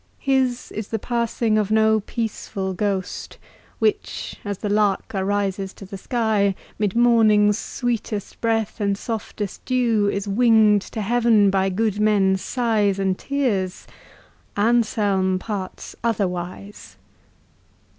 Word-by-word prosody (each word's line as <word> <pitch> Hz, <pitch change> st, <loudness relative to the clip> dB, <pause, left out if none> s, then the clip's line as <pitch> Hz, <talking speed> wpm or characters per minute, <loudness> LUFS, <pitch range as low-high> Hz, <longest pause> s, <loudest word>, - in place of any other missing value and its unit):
His 265 Hz, -3 st, 0 dB
is 215 Hz, -1 st, -5 dB
the 225 Hz, -, -2 dB
passing 230 Hz, -1 st, 0 dB
of 210 Hz, -2 st, -1 dB
no 220 Hz, 0 st, +4 dB
peaceful 205 Hz, -3 st, -4 dB
ghost, 190 Hz, -1 st, -3 dB, 0.4 s
Which, 420 Hz, -1 st, -1 dB
as 205 Hz, -2 st, -4 dB
the 210 Hz, -, -4 dB
lark 205 Hz, -1 st, +1 dB
arises 195 Hz, 0 st, -1 dB
to 195 Hz, -, -10 dB
the 195 Hz, -, -8 dB
sky, 210 Hz, -2 st, 0 dB, 0.2 s
'Mid 210 Hz, -2 st, 0 dB
morning's 220 Hz, -3 st, +4 dB
sweetest 230 Hz, -5 st, -4 dB
breeze 225 Hz, -2 st, 0 dB
and 200 Hz, -1 st, 0 dB
softest 210 Hz, -2 st, -5 dB
dew, 235 Hz, -5 st, +1 dB
Is 200 Hz, +1 st, -3 dB
wing'd 215 Hz, -1 st, +4 dB
to 220 Hz, -, -3 dB
heaven 225 Hz, -2 st, +3 dB
by 195 Hz, 0 st, +1 dB
good 210 Hz, +1 st, -1 dB
men's 195 Hz, -3 st, +3 dB
sighs 220 Hz, -6 st, +1 dB
and 190 Hz, -1 st, 0 dB
tears!— 210 Hz, -9 st, -2 dB, 0.7 s
Anselm 205 Hz, -4 st, +2 dB
parts 195 Hz, -1 st, -6 dB
otherwise. 195 Hz, -2 st, -3 dB
210 Hz, 120 wpm, -22 LUFS, 195-230 Hz, 0.7 s, no